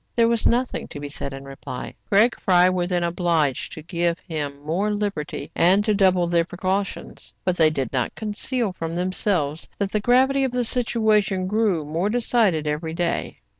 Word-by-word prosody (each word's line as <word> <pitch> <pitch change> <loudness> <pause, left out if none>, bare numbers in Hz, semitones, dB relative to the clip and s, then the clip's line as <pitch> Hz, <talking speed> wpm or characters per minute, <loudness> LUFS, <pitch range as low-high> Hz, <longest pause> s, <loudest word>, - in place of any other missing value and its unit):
There 230 -1 +4
was 230 -1 +2
nothing 245 +1 0
to 145 - -8
be 145 0 -6
said 140 -1 -5
in 135 0 -8
reply. 135 -2 -7 0.2
Craig 215 +5 +4
Fry 180 -1 +4
were 180 -1 -1
then 175 -1 0
obliged 170 -5 0
to 155 - -9
give 170 0 -1
him 145 -6 -5
more 175 +8 0
liberty, 200 -9 -3
and 190 +4 +4
to 215 - +2
double 185 -3 +3
their 170 0 +2
precautions. 190 +3 -4
But 185 -1 +1
they 160 -1 +5
did 135 -5 -3
not 125 -3 -1
conceal 220 0 -2
from 165 -2 -5
themselves 180 -4 -1
that 200 -1 -2
the 215 - +1
gravity 260 +5 +3
of 260 -2 -1
the 250 0 +1
situation 220 -5 +1
grew 200 -5 +1
more 165 +7 -1
decided 220 -8 +1
every 155 +2 -2
day. 175 -1 -2
185 Hz, 180 wpm, -23 LUFS, 160-210 Hz, 0.2 s, they